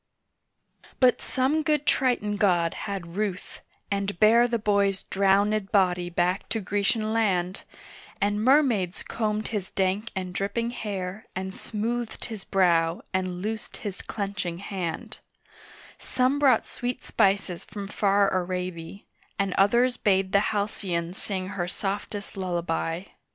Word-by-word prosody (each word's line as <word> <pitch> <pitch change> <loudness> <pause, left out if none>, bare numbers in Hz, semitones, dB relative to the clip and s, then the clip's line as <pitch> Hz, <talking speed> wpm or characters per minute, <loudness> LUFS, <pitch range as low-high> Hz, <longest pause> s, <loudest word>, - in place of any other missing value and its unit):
BUT 255 -1 +4
some 270 +4 +1
good 300 -1 +1
Triton 245 -7 +2
god 175 -4 +3 0.2
had 180 -4 -5
ruth, 200 -3 -3 0.3
and 200 -1 -1
bare 230 +3 +6
The 235 -1 0
boy's 200 -2 +1
drowned 200 +1 +2
body 180 -3 +2
back 175 +3 0
to 225 - 0
Grecian 210 +2 0
land, 190 -4 +1 0.6
And 205 +1 +1
mermaids 245 - +3
combed 215 -1 -2
his 205 -4 -3
dank 195 +4 0
and 185 -1 -3
dripping 205 +5 -1
hair 200 -3 -5
And 190 +1 -4
smoothed 230 +3 -3
his 220 -4 -6
brow, 170 -3 +2
and 185 -1 -2
loosed 220 +1 -4
his 200 -2 -4
clenching 195 -4 -3
hand; 185 -3 -5 0.8
Some 260 +3 +1
brought 265 -6 +4
sweet 245 0 -4
spices 190 -3 +1
from 205 -1 -7
far 200 0 +2
Araby, 180 0 -3 0.3
And 195 -2 0
others 240 +5 +3
bade 190 -2 +2
the 200 - +5
halcyon 190 -5 -2
sing 190 -1 -4
her 175 -3 -2
softest 200 +2 -4
lullaby. 175 -2 -2
200 Hz, 130 wpm, -26 LUFS, 185-215 Hz, 0.8 s, bare